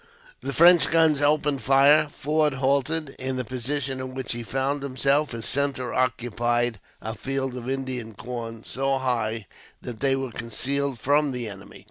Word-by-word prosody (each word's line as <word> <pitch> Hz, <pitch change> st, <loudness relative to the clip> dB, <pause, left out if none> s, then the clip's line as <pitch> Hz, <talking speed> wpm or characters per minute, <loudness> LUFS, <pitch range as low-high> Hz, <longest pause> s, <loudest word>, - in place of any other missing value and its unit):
The -, -, -3 dB
French 170 Hz, +4 st, +6 dB
guns 160 Hz, -3 st, +3 dB
opened 145 Hz, -1 st, +2 dB
fire. 140 Hz, +3 st, +5 dB
Forde 150 Hz, 0 st, 0 dB
halted. 140 Hz, +3 st, 0 dB
In 130 Hz, 0 st, -2 dB
the 125 Hz, -1 st, -2 dB
position 130 Hz, +2 st, -3 dB
in 130 Hz, 0 st, -6 dB
which 130 Hz, -2 st, -3 dB
he 120 Hz, -, -5 dB
found 135 Hz, +4 st, -1 dB
himself, 140 Hz, +2 st, +1 dB
his 115 Hz, -1 st, -4 dB
centre 140 Hz, -2 st, -1 dB
occupied 120 Hz, -2 st, 0 dB, 0.2 s
a 110 Hz, -, -3 dB
field 135 Hz, +1 st, -3 dB
of 125 Hz, 0 st, -6 dB
Indian 130 Hz, -4 st, -4 dB
corn, 115 Hz, 0 st, -6 dB
so 135 Hz, +1 st, -1 dB
high 115 Hz, -4 st, -1 dB, 0.4 s
that 120 Hz, -3 st, -7 dB
they 135 Hz, -1 st, +2 dB
were 135 Hz, -2 st, -3 dB
concealed 130 Hz, +4 st, -2 dB
from 145 Hz, +3 st, +2 dB
the 125 Hz, -2 st, -4 dB
enemy. 100 Hz, -1 st, -10 dB
130 Hz, 160 wpm, -25 LUFS, 120-140 Hz, 0.4 s, French